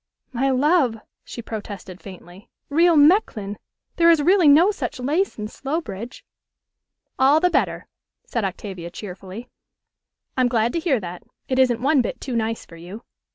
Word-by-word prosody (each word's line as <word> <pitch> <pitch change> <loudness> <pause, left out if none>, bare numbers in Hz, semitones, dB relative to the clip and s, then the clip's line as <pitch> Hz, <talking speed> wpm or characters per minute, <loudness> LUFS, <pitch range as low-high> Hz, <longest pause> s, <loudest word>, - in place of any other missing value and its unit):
"My 265 +3 +1
love," 270 -2 +2 0.3
she 235 - -9
protested 205 -4 -8
faintly, 185 +1 -13 0.2
"real 335 +3 +4
Mechlin! 290 - +3 0.4
There 335 0 +5
is 330 -2 +5
really 355 +2 +4
no 320 +8 +6
such 255 - -5
lace 305 +10 -1
in 210 -1 -4
Slowbridge." 255 - -6 0.9
"All 275 +4 +5
the 360 +2 +2
better," - - 0 0.4
said 235 - -3
Octavia 190 -2 -5
cheerfully. 190 +4 -9 0.9
"I'm 255 -1 +3
glad 235 -1 0
to - - 0
hear 315 -7 +1
that. 175 -1 -7 0.3
It 260 0 0
isn't 245 -2 +2
one 280 0 +4
bit - - -4
too 255 -3 -5
nice 225 0 -2
for 165 - -14
you." 185 +7 -10
245 Hz, 155 wpm, -22 LUFS, 205-295 Hz, 0.9 s, no